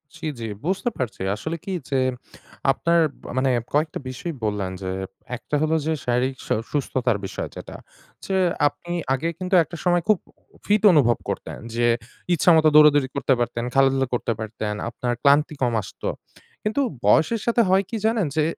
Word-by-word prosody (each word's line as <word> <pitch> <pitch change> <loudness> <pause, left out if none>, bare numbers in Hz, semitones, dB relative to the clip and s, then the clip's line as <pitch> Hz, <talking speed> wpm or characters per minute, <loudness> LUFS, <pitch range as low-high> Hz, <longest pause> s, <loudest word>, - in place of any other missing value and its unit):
জি, 160 - -8
জি 115 - -4 0.2
বুঝতে 195 +6 0
পারছি। 120 -6 -4
আসলে 160 +10 -4
কি 195 - -4 0.2
যে 135 -1 +1 0.7
আপনার 170 +4 +2 0.4
মানে 130 0 +2 0.2
কয়েকটা 155 +2 0
বিষয় 165 +6 -5
বললেন 105 -3 -1
যে 95 - -3 0.5
একটা 150 - -4
হলো 155 +1 +2
যে 160 - +1
শারীরিক 125 +2 0
স - - -14 0.2
সুস্থতার 130 -5 0
বিষয় - - -5
যেটা - - -8 0.5
যে 195 - -1 0.3
আপনি 175 +4 -7 0.2
আগে 135 +5 -1
কিন্তু 185 0 0
একটা 165 +2 -9
সময় 175 -2 +2
খুব 215 -2 +5 0.5
ফিট 210 +1 +2
অনুভব 120 -6 +4
করতেন। - - -4 0.2
যে 120 0 +2 0.5
ইচ্ছামত 160 -1 +5
দৌড়াদৌড়ি 145 -3 +6
করতে 135 -1 +2
পারতেন, 120 -1 -1
খেলাধুলা 135 -1 +3
করতে 120 -1 0
পারতেন, 110 -1 -4 0.2
আপনার 120 +1 -2
ক্লান্তি 145 +2 +4
কম 125 -2 +2
আসত। - - -13 0.6
কিন্তু 215 +7 0 0.2
বয়সের 200 - +4
সাথে 235 0 +3
হয় 190 +1 +4
কি 230 - -3
জানেন 220 -7 +2
যে 155 - +3
145 Hz, 160 wpm, -23 LUFS, 125-170 Hz, 0.7 s, দৌড়াদৌড়ি